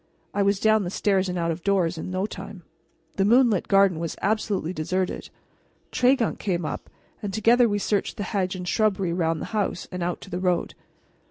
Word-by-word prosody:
I 205 - +1
was 200 0 +2
down 220 0 +4
the 175 - -3
stairs 190 0 +1
and 180 - -2
out 170 -1 0
of 165 +1 -6
doors 185 -4 +2
in 160 - -6
no 185 +1 -1
time. 195 -2 -8 0.5
The 195 - +3
moonlit 230 -2 +4
garden 195 -4 +4
was 165 -1 -3
absolutely 205 -4 -1
deserted. 185 +3 -2 0.6
Tregunc 250 -2 +2
came 175 -5 -1
up, - - -5 0.3
and 205 - -3
together 230 +4 +4
we 205 - 0
searched 205 +2 -1
the 205 - -2
hedge 190 -2 -1
and 180 -1 -6
shrubbery 195 -3 +1
around 165 -2 0
the - - -3
house 205 -4 -1
and 180 - -5
out 175 0 -2
to 195 - -11
the 180 - -2
road. 180 -1 0
195 Hz, 195 wpm, -25 LUFS, 180-210 Hz, 0.6 s, down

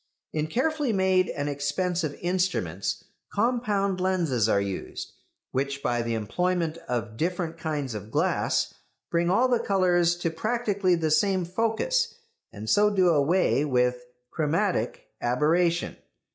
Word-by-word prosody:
In 155 0 -1
carefully 290 - 0
made 190 -2 +2
and 145 0 -3
expensive 150 +3 -1
instruments 175 - -1 0.3
compound 205 -4 0
lenses 165 - +1
are 100 - +3
used, 100 -2 -5 0.4
which 140 +1 -2
by 120 0 +1
the 115 0 -1
employment 170 - -1
of 115 -3 -2
different 170 0 -2
kinds 150 -6 -2
of 105 0 -7
glass - - +1 0.4
bring 170 0 +2
all 235 +8 +4
the 245 -2 +2
colours 175 -3 +2
to 175 -1 -2
practically 200 0 +1
the 160 -2 -1
same 185 +3 +2
focus, 225 - 0 0.4
and 105 +1 -8
so 210 - +4
do 190 -3 +3
away 155 0 +3
with 125 -3 +1 0.3
chromatic 160 - 0 0.2
aberration. 165 +8 +1
170 Hz, 130 wpm, -26 LUFS, 140-190 Hz, 0.4 s, all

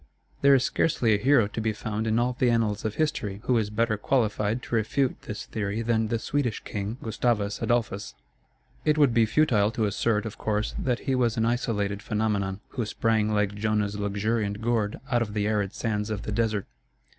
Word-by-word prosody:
There 140 0 +7
is 130 - +3
scarcely 125 -9 +2
a 100 - +2
hero 135 -4 +5
to 110 - -4
be 110 0 0
found 110 +1 -3
in 110 +1 +2
all 120 +1 +1
the 125 0 +2
annals 110 -3 +1
of 110 - -2
history 110 -11 -1
who 125 -2 +2
is 105 -2 -1
better 110 +1 0
qualified 105 -1 0
to - - -8
refute 125 +4 0
this 105 - -5
theory 105 +1 -3
than 110 -1 +1
the 115 - 0
Swedish 120 +1 -1
king, 105 +3 -4
Gustavus 110 -2 0
Adolphus. 105 - -1 0.7
It 155 0 +2
would 145 -5 +4
be 115 -2 +4
futile 110 -7 +3
to 110 - 0
assert, 105 +1 0
of 110 0 -7
course, 105 0 -1
that 125 -2 -1
he 135 - -1
was 120 -3 +1
an 115 - +2
isolated 105 -4 -1
phenomenon, 105 -3 -1
who 120 - -3
sprang 110 -1 +1
like 105 -1 +1
Jonah's 105 0 -1
luxuriant 100 +1 -1
gourd 110 -2 0
out 120 -1 +3
of 105 -2 -3
the 105 -1 0
arid 105 -2 0
sands 105 -1 -2
of 105 -2 -3
the - - -4
desert. 110 -2 0
110 Hz, 195 wpm, -26 LUFS, 105-120 Hz, 0.7 s, There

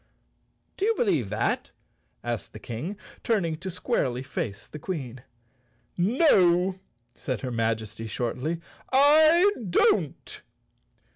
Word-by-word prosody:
"Do 390 - 0
you 450 +1 +2
believe 160 - +1
that?" 105 +2 -1 0.5
asked 120 -2 -4
the 110 - -9
King, 130 - -5 0.3
turning 190 -9 +1
to 190 +4 -6
squarely 165 - -1
face 105 -6 -5
the 150 - -9
Queen. 135 -8 -5 0.7
"No!" 185 - +3 0.3
said 130 - -4
her 130 - -4
Majesty 110 -1 -2
shortly, 125 +9 -2 0.3
"I 310 +6 +6 0.2
don't." 405 - +1
165 Hz, 110 wpm, -26 LUFS, -, 0.7 s, I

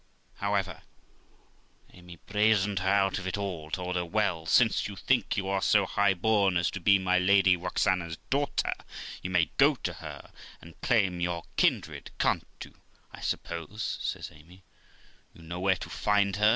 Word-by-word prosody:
However, - - -1 1.1
Amy 90 -1 -13
brazened 105 +1 +1
her 95 +1 0
out 95 -1 +2
of 95 - -6
it 95 - -2
all; 90 -6 -4
told 90 +2 -3
her, 90 - 0
'Well, 85 -3 -1
since 110 +6 +3
you 100 - -8
think 120 +3 0
you 95 -1 -1
are 95 0 0
so 105 0 +3
high 100 0 +2
born 100 -1 +2
as 85 - +1
to - - -5
be 100 -1 +5
my 90 -1 +2
Lady 95 0 +4
Roxana's 90 -1 -1
daughter, 140 +1 0 0.5
you 95 - -4
may 90 -4 +1
go - - +5
to - - -4
her - - -10 0.3
and 85 -1 -16
claim 95 -7 +2
your 85 -1 -2
kindred, - - 0
can't - - +1 0.2
you? - - -17 0.4
I - - -11
suppose', 85 +6 -4
says - - -4
Amy, 85 +5 -18 0.7
'you 85 - -15
know 85 +2 -6
where 95 +1 +2
to - - -7
find 100 -2 +1
her?' 105 +1 +5
95 Hz, 170 wpm, -28 LUFS, 90-100 Hz, 1.1 s, be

